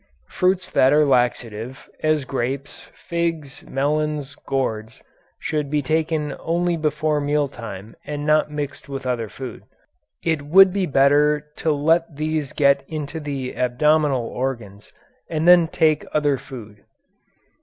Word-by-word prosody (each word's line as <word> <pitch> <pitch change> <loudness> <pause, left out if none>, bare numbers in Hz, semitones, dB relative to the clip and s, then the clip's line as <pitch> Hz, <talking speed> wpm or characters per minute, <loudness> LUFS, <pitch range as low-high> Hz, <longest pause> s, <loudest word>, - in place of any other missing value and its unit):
6. - - -18
Fruits 185 0 +1
that 130 - +4
are 150 0 +5
laxative, 120 -2 -1
as 155 -3 +1
grapes, 135 +2 -4
figs, 165 -5 -3
melons, 150 0 -1
gourds, 115 -5 -3 0.3
should 150 -2 -2
be 150 0 0
taken 155 0 -1
only 175 +1 0
before 155 -1 0
meal 145 0 +1
time 110 -5 -9
and 145 0 -5
not 155 0 +3
mixed 145 -2 -6
with 135 -1 -5
other 120 -4 -2
food. 130 +3 -8 0.6
It 160 -3 0
would 185 +6 +6
be 195 -2 0
better 145 +2 +3
to 160 - 0
let 160 +2 +1
these 155 -1 -2
get 140 -2 +3
into 155 0 -5
the 140 -4 -4
abdominal 135 +1 +2
organs 115 -6 -5 0.4
and 160 0 -1
then 175 -2 +7
take 155 -1 +2
other 145 -3 +2
food. 110 -6 -11
145 Hz, 135 wpm, -22 LUFS, 130-155 Hz, 0.6 s, then